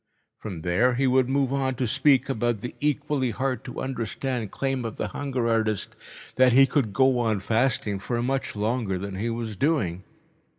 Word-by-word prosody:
From 90 -7 -7
there 115 +9 +2
he 135 +2 +1
would 130 0 +3
move 135 -1 +1
on 135 -1 0
to 125 0 -1
speak 135 +1 +3
about 120 -4 -1
the 125 - -5
equally 145 -2 0
hard 130 +1 -2
to 125 - -6
understand 125 -2 -3
claim 135 +1 -2
of 115 -2 -4
the 105 - -3
hunger 130 0 -2
artist 110 -3 0 0.4
that 130 -1 +5
he 135 +2 +7
could 130 -5 0
go 130 +3 +3
on 110 -4 +1
fasting 110 -1 0
for 120 +4 -2
much 135 -1 -2
longer 105 -2 -1
than 100 +2 -5
he 105 +5 -2
was 115 -2 -4
doing. 95 - 0
125 Hz, 180 wpm, -25 LUFS, 110-135 Hz, 0.4 s, he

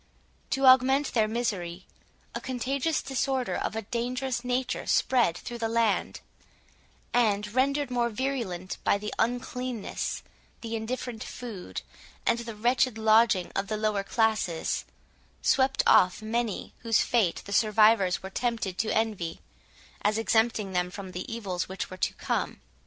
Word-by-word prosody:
To 270 0 +1
augment 260 +2 +5
their 220 -3 +3
misery, 195 -6 -3 0.5
a - - -4
contagious 260 +5 -1
disorder 265 -1 -1
of - - -2
a 225 - -3
dangerous 245 +2 -2
nature 250 0 -1
spread 240 -10 +3
through 240 +5 -7
the 225 -1 -1
land; 230 -2 +1 0.9
and, 210 -3 +2
rendered 275 +1 +1
more 240 -1 +1
virulent 220 -7 -3
by - - +3
the 210 +1 -5
uncleanness, 245 -1 -2 0.4
the 230 -1 -4
indifferent 225 0 -4
food, 225 -7 -7 0.4
and 235 - +2
the 230 -2 -6
wretched 240 +1 +2
lodging 220 -4 +4
of 195 0 -1
the 215 - -2
lower 215 -2 0
classes, 215 -6 0 0.6
swept 265 0 +3
off 180 0 +5
many 225 -1 -2
whose 230 -2 +2
fate 220 -8 +1
the 200 - -5
survivors 215 -3 +4
were 190 - -6
tempted 225 -5 -2
to 220 - 0
envy, 210 -7 -1 0.6
as 210 +1 +2
exempting 220 -2 +1
them 180 -1 0
from 190 0 -8
the 180 +4 -6
evils 195 -7 -3
which 190 -1 -5
were 185 - -7
to - - -1
come. - - -2
225 Hz, 140 wpm, -28 LUFS, 200-245 Hz, 0.9 s, augment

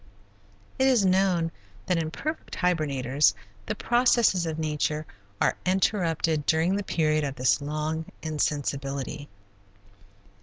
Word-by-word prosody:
It 265 - +4
is 245 -7 +4
known 185 -3 +2 0.3
that 180 -2 +1
in 160 -1 -2
perfect 310 - -5
hibernators 145 -6 +1 0.3
the - - -2
processes 240 -7 +3
of 160 -1 -3
nature 155 0 -1 0.3
are - - +2
interrupted 170 -5 +1
during 165 +4 +2
the 205 - -1
period 155 -4 +1
of 140 -2 -3
this 130 +2 +2
long 155 +2 -3 0.2
insensibility. 145 -2 -2
160 Hz, 115 wpm, -26 LUFS, 150-185 Hz, 0.3 s, It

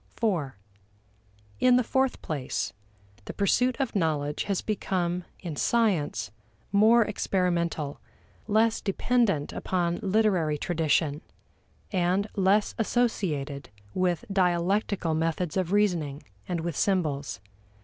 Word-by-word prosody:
(iv) 165 -12 +1 1.1
In 250 -1 +5
the 250 - +4
fourth 265 +2 0
place, 145 -5 -3 0.5
the - - -7
pursuit 250 +6 +2
of 265 -5 -1
knowledge 150 -5 0
has 200 -3 -1
become, 180 -4 -1 0.2
in 170 -5 -5
science, 170 - +1 0.4
more 220 +4 +6
experimental, 170 -7 -1 0.5
less 220 +1 +2
dependent 200 -6 +1
upon 175 -2 -1
literary 190 -7 +2
tradition, 155 -2 0 0.7
and 185 +1 +1
less 200 +1 +3
associated 160 - -1 0.2
with 180 +3 0
dialectical 180 -1 +1
methods 165 +1 -1
of 185 -2 0
reasoning, 170 -9 +1 0.2
and 175 -2 -2
with 170 -2 -3
symbols. 145 - 0
180 Hz, 105 wpm, -27 LUFS, 160-210 Hz, 1.1 s, more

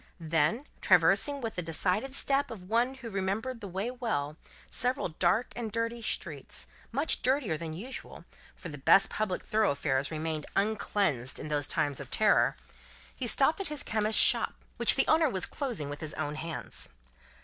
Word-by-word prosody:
Then, 165 - +1 0.2
traversing 285 -1 +4
with 225 -2 -4
the - - 0
decided 185 +10 -1
step 275 +1 +1
of 185 -5 -9
one 240 +5 +1
who 255 -3 -8
remembered 205 +6 -2
the 200 - -6
way 195 +6 -3
well, 215 - -2 0.4
several 250 -4 +1
dark 185 +9 0
and 230 -3 -4
dirty 230 +1 -2
streets - - -2 0.3
much 280 +7 +1
dirtier 255 - +1
than 160 0 -6
usual, 250 +9 -8 0.3
for 180 - -9
the 145 -2 -8
best 195 +8 +5
public 210 -4 -2
thoroughfares 145 - 0
remained 155 -1 -3
uncleansed 195 - 0
in 150 - -6
those 145 -2 0
times 145 -3 -1
of 140 -2 -8
terror 215 -1 +3 0.6
he 255 - -3
stopped 280 - +3
at 390 - -3
a 300 -2 -2
chemist's 215 0 +2
shop, - - +3 0.2
which - - +7
the - - +3
owner 315 -1 +4
was 190 -6 0
closing 240 - -3
with 145 0 -6
his 155 -1 -5
own 150 -1 -3
hands. 155 - -3
205 Hz, 170 wpm, -30 LUFS, 155-245 Hz, 0.6 s, which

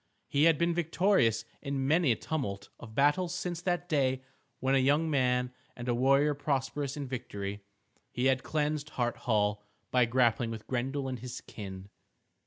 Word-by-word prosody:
He 145 +2 +3
had 165 -2 +5
been 170 +2 +2
victorious 165 - +2 0.2
in 140 -2 -2
many 160 -2 +4
a - - +3
tumult 120 -9 -4
of 110 -2 -11
battle 145 +7 +3
since 175 -1 -4
that 175 -1 -1
day 130 -5 +1 0.4
when 130 +1 +1
a 135 - +5
young 145 +5 +2
man 125 -2 +1 0.2
and 120 0 -7
a 120 - +2
warrior 135 +4 +4
prosperous 140 0 -2
in 140 -2 -4
victory, 100 -5 -5 0.5
he 125 - -1
had 130 0 +3
cleansed 150 -1 -1
Hart 120 -1 +1
Hall 105 -1 +2 0.3
by 125 -1 +4
grappling 120 -1 +2
with 110 -1 -6
Grendel 135 +2 -2
and 130 -2 -4
his 125 +1 -7
kin. 95 -1 -9
130 Hz, 170 wpm, -30 LUFS, 120-150 Hz, 0.5 s, had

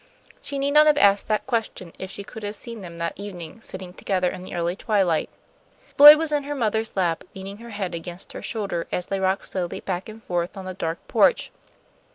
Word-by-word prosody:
She 280 - -5
need 275 +1 0
not 300 +1 +6
have 300 -1 +5
asked 200 -4 +4
that 215 -1 0
question 225 -8 -3
if 190 - -6
she 200 +1 -6
could 220 - -10
have 205 0 -4
seen 230 0 -7
them 170 -2 -9
that 170 0 -2
evening, 200 0 -8
sitting 185 -3 -8
together 185 -1 0
in 185 - -8
the 185 - -8
early 170 +1 -1
twilight. 190 -7 +1 0.7
Lloyd 295 +1 +12
was 320 -1 +1
in 295 -1 +2
her 290 0 -3
mother's 220 -3 -1
lap, 175 -4 0
leaning 195 +1 -7
her 235 +2 -11
head 200 -5 -4
against 175 +2 -7
her - - -7
shoulder 200 -7 -3
as 180 - -1
they 195 +1 -2
rocked 190 +1 0
slowly 180 -2 -3
back 185 +1 -4
and 220 +1 -11
forth 175 +1 -2
on 190 - -7
the 185 - -5
dark 165 -3 -3
porch. - - +3
195 Hz, 215 wpm, -24 LUFS, 180-225 Hz, 0.7 s, Lloyd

